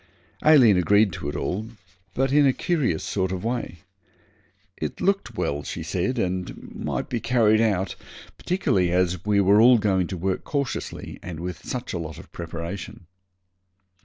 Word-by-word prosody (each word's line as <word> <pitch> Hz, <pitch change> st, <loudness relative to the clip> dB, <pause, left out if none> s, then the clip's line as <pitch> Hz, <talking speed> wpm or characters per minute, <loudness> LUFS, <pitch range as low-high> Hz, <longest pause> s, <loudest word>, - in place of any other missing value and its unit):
Aileen 130 Hz, -10 st, +7 dB
agreed 100 Hz, +2 st, +3 dB
to 70 Hz, -, -4 dB
it -, -, -5 dB
all, 110 Hz, +4 st, -3 dB, 0.5 s
but 135 Hz, +1 st, +1 dB
in 145 Hz, 0 st, +5 dB
a 130 Hz, -, +4 dB
curious 140 Hz, -, 0 dB
sort 95 Hz, -2 st, -1 dB
of 95 Hz, 0 st, -4 dB
way. 115 Hz, -8 st, -3 dB, 1.0 s
'It -, -, -4 dB
looked 195 Hz, -, 0 dB
well,' 70 Hz, +1 st, -1 dB
she 80 Hz, +3 st, -6 dB
said, 90 Hz, +9 st, -1 dB
'and 90 Hz, -4 st, -3 dB
might -, -, -3 dB
be 120 Hz, -, -2 dB
carried 115 Hz, -2 st, +3 dB
out, 100 Hz, -4 st, 0 dB, 0.4 s
particularly 100 Hz, -, 0 dB
as 90 Hz, -1 st, +1 dB
we 105 Hz, -1 st, +3 dB
were 100 Hz, +2 st, +5 dB
all 125 Hz, +1 st, +7 dB
going 95 Hz, -4 st, +1 dB
to 95 Hz, -, -5 dB
work 95 Hz, +2 st, -2 dB
cautiously 140 Hz, -3 st, -4 dB
and 85 Hz, -3 st, -7 dB
with 90 Hz, 0 st, -6 dB
such 125 Hz, -1 st, -5 dB
a 90 Hz, -, -2 dB
lot 80 Hz, -2 st, -6 dB
of -, -, -13 dB
preparation.' 85 Hz, +2 st, -7 dB
100 Hz, 160 wpm, -24 LUFS, 90-120 Hz, 1.0 s, Aileen